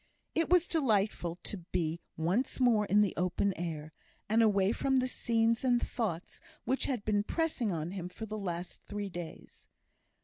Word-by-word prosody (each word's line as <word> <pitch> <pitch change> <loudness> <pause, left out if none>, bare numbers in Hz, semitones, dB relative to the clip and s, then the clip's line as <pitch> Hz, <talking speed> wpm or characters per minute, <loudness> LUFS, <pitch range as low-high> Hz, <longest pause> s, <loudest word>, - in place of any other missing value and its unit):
It 330 0 +1
was 355 -1 +5
delightful 210 - +1
to 205 - -5
be 165 0 -1 0.2
once 185 +14 0
more 230 -5 +4
in 205 +2 +5
the 205 -3 +2
open 185 +2 +1
air, 160 -2 -5 0.3
and 220 +3 +4
away 200 -3 +4
from 265 +3 +1
the 255 0 +2
scenes 230 -2 +1
and 245 -2 +4
thoughts 195 -10 -3 0.2
which 265 - 0
had 245 -6 -2
been 205 -1 +2
pressing 265 -3 0
on 165 0 -2
him 185 -2 -5
for 220 +4 -7
the 215 0 -5
last 175 -2 -4
three 205 -1 -3
days. 175 -2 -9
205 Hz, 170 wpm, -32 LUFS, 175-240 Hz, 0.3 s, was